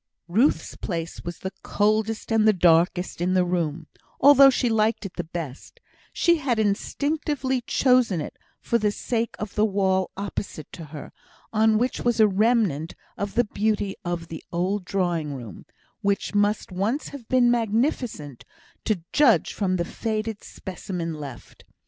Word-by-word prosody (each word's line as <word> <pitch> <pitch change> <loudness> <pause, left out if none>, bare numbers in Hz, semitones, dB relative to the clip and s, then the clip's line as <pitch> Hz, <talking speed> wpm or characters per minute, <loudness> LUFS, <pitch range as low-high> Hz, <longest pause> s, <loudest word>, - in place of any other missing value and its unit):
Ruth's 225 - +1
place 165 -3 -5
was 170 0 -6
the 190 0 -6
coldest 215 +2 0
and 220 -1 +4
the 215 - +6
darkest 175 0 +2
in 185 +1 +1
the 180 -1 +3
room, 170 -3 -2 0.3
although 275 0 +8
she 255 -1 +1
liked 220 -1 +1
it 195 - -6
the 175 - -4
best; 160 -5 -7 0.3
she 340 -1 +3
had 270 -6 0
instinctively 265 +5 -1
chosen 250 -9 +3
it 150 - -6 0.2
for 235 - 0
the 210 -1 +2
sake 230 +2 -2
of 210 -2 -6
the 210 - +2
wall 190 -3 +1
opposite 195 -6 -5
to 165 - -9
her, 150 0 -9 0.4
on 220 0 +4
which 245 +3 0
was 240 -2 +1
a 215 - +7
remnant 200 - +1 0.2
of 200 0 -4
the 240 - +3
beauty 205 -2 -1
of 175 -2 -4
the 160 - -7
old 185 +3 -1
drawing 175 -7 -1
room, 115 -8 -10 0.3
which 200 +1 0
must 205 0 +1
once 205 +10 -1
have 265 -6 -11
been 250 -2 +4
magnificent, 225 - -1 0.4
to 200 -7 0
judge 285 -7 +4
from 185 -3 0
the 170 -1 -1
faded 220 +1 -3
specimen 180 -3 -5
left. 140 -5 -10
205 Hz, 155 wpm, -24 LUFS, 175-230 Hz, 0.4 s, although